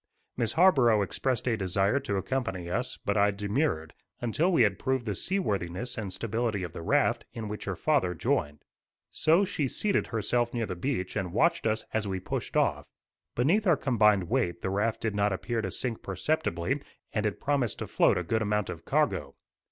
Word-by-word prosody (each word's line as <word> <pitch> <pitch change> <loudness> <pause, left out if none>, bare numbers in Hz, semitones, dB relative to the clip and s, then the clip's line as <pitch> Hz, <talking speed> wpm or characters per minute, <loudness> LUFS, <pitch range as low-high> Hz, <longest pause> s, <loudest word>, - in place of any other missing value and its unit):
Miss 115 - 0
Harborough 130 - +5
expressed 125 +5 -1
a 120 - +2
desire 100 +5 +1
to 120 -7 -3
accompany 95 -5 -2
us, 120 +6 -1
but 100 - +1
I 100 0 +5
demurred, 100 - -1 0.3
until 150 +10 +1
we 165 -9 +5
had 100 -3 +1
proved 130 -2 -1
the 105 - -1
seaworthiness 105 - -2
and 105 -6 -4
stability 110 0 -2
of 85 -2 -6
the - - -6
raft, - - +2
in 110 -2 -5
which 105 +1 -6
her 95 - -2
father 90 - +1
joined. 75 -2 -1 0.5
So 165 +6 +3
she 150 -6 -1
seated 200 +9 0
herself 120 +2 0
near 115 -1 0
the 95 - -4
beach 95 -1 -2
and 95 -4 -2
watched 160 - +2
us 110 0 0
as 110 -2 0
we 95 -1 -2
pushed - - -3
off. - - +1 0.5
Beneath 180 - +2
our 170 -4 +5
combined 105 -6 +3
weight 85 0 -1
the 95 - -1
raft 105 +3 0
did 115 -2 -1
not 100 0 +1
appear 115 +4 -2
to - - -3
sink 120 -3 -3
perceptibly, 120 - -1 0.3
and 105 -1 +1
it 105 - -4
promised 140 -6 0
to - - -4
float - - +3
a 90 - -1
good 110 +6 0
amount 105 -2 0
of - - -9
cargo. - - 0
110 Hz, 190 wpm, -28 LUFS, 95-130 Hz, 0.5 s, Harborough